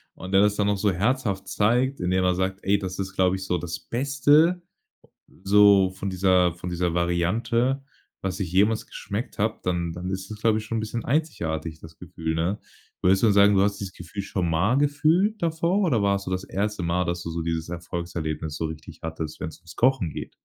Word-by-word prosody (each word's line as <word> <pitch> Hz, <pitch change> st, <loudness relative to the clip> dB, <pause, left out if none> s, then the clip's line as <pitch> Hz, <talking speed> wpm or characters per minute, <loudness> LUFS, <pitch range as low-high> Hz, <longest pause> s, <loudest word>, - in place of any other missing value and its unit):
und 95 Hz, -, -8 dB
der 95 Hz, 0 st, +5 dB
das 105 Hz, 0 st, +3 dB
dann 105 Hz, -, +1 dB
noch 100 Hz, 0 st, +1 dB
so 105 Hz, 0 st, +2 dB
herzhaft 105 Hz, +1 st, -1 dB
zeigt, 125 Hz, +6 st, +1 dB
indem 90 Hz, +1 st, +1 dB
er 90 Hz, 0 st, +3 dB
sagt: 95 Hz, +2 st, -2 dB
„Ey, 100 Hz, +1 st, +2 dB
das 95 Hz, -1 st, -5 dB
ist, 95 Hz, 0 st, -4 dB
glaub 95 Hz, -1 st, +2 dB
ich, 95 Hz, -, -5 dB
so 90 Hz, -1 st, 0 dB
das 85 Hz, +1 st, -5 dB
Beste 145 Hz, +7 st, +2 dB, 0.8 s
so 100 Hz, -1 st, +6 dB
von 95 Hz, +1 st, -5 dB
dieser 90 Hz, -2 st, +3 dB
von 90 Hz, +1 st, -6 dB
dieser 90 Hz, -1 st, -1 dB
Variante, 115 Hz, +10 st, 0 dB, 0.4 s
was 95 Hz, +1 st, -3 dB
ich 90 Hz, -4 st, -2 dB
jemals 105 Hz, +5 st, +2 dB
geschmeckt 105 Hz, +4 st, -6 dB
habe.“ 110 Hz, +1 st, 0 dB
Dann 85 Hz, -2 st, -1 dB
dann 90 Hz, +2 st, -6 dB
ist 95 Hz, +1 st, -4 dB
das, 105 Hz, -1 st, -8 dB
glaube 110 Hz, -1 st, +3 dB
ich, 110 Hz, -, -3 dB
schon 115 Hz, +1 st, -3 dB
'n -, -, 0 dB
bisschen 110 Hz, +1 st, -4 dB
einzigartig 85 Hz, -, -2 dB
das 80 Hz, 0 st, -13 dB
Gefühl, 80 Hz, -2 st, -4 dB
ne? 85 Hz, +5 st, -1 dB, 0.4 s
Würdest 95 Hz, +1 st, +4 dB
du -, -, +5 dB
dann 105 Hz, -, +4 dB
sagen, 100 Hz, 0 st, +6 dB
du 95 Hz, -, +4 dB
hast 100 Hz, 0 st, +1 dB
dieses 95 Hz, -2 st, -5 dB
Gefühl 90 Hz, +3 st, -7 dB
schon 95 Hz, -3 st, -2 dB
mal 90 Hz, +11 st, +2 dB
gefühlt 160 Hz, +9 st, +2 dB
davor, 170 Hz, +4 st, +1 dB
oder 140 Hz, -, +2 dB
war 100 Hz, 0 st, +3 dB
es 100 Hz, -, -6 dB
so, -, -, -5 dB
das 95 Hz, 0 st, -1 dB
1. 105 Hz, 0 st, -2 dB
Mal, 85 Hz, +2 st, 0 dB
dass 85 Hz, 0 st, -3 dB
du -, -, -5 dB
so 85 Hz, 0 st, -3 dB
dieses 80 Hz, 0 st, -2 dB
Erfolgserlebnis 85 Hz, -2 st, -4 dB
so 80 Hz, -, -3 dB
richtig 80 Hz, -1 st, -7 dB
hattest, 80 Hz, -1 st, -5 dB
wenn's 80 Hz, -, -6 dB
ums 85 Hz, -2 st, -15 dB
Kochen 130 Hz, -7 st, +2 dB
geht? -, -, -6 dB
95 Hz, 215 wpm, -25 LUFS, 85-110 Hz, 0.8 s, so